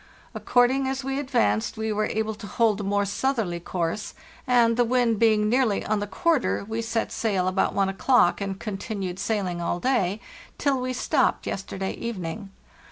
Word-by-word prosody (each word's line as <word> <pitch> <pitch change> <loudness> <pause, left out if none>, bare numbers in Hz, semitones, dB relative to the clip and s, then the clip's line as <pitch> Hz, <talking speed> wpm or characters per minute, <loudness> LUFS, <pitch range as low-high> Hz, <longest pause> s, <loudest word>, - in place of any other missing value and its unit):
According 260 +2 +2
as 265 0 -2
we 270 +1 -2
advanced 220 - 0
we 220 0 -1
were 215 0 0
able 220 0 -1
to 210 -1 -9
hold 215 0 +1
a - - -4
more 200 +1 +1
southerly 205 -4 -1
course, 170 +3 -3 0.3
and, 235 -2 +4
the 245 - +3
wind 240 -2 +1
being 215 -2 +4
nearly 235 -2 +1
on 215 0 0
the 205 - -3
quarter, 320 - 0
we 225 +1 -2
set 230 0 -2
sail 195 -5 0
about 185 +1 +1
1 195 -1 +2
o'clock, 195 -1 +3
and 195 -1 -3
continued 195 -3 -4
sailing 200 -4 -1
all 175 +1 -1
day 210 -5 +1 0.4
till 275 -4 +1
we 255 0 -2
stopped 260 +1 +1
yesterday 195 0 -4
evening. 200 -3 -5
215 Hz, 170 wpm, -25 LUFS, 195-245 Hz, 0.4 s, and